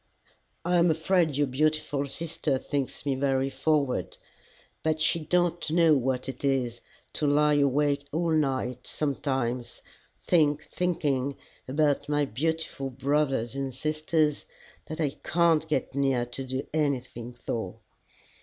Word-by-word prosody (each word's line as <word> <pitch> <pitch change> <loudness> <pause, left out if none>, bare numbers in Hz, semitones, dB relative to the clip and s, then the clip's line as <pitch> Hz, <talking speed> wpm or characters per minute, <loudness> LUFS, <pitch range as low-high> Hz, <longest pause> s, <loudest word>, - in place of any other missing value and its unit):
I'm 175 0 +4
afraid 160 -2 +2
your 145 - +3
beautiful 145 +1 0
sister 155 -2 -2
thinks 140 +1 -3
me 140 - +1
very 135 0 +1
forward. 145 -5 0 0.6
But 155 0 0
she 160 +1 +3
don't 175 +1 +1
know 165 0 +5
what 130 -2 0
it 130 0 -6
is 125 -4 0 0.3
to 150 - 0
lie 150 +1 +4
awake 145 +1 +2
all 165 +2 0
night 130 -5 0
sometimes, 130 -4 -2 0.4
think 150 -4 +2
thinking 140 -6 -1 0.3
about 145 +1 +1
my 145 -1 +2
beautiful 150 +2 -2
brothers 135 -3 0
and 135 -2 -3
sisters 155 +1 0 0.4
that 155 +2 -6
I 145 -4 -1
can't 165 -2 +3
get 150 -5 -1
near 135 -3 +1
to 125 +2 -6
do 130 +1 -3
anything 130 -5 -2
for." 110 -5 -4
145 Hz, 125 wpm, -28 LUFS, 130-155 Hz, 0.6 s, know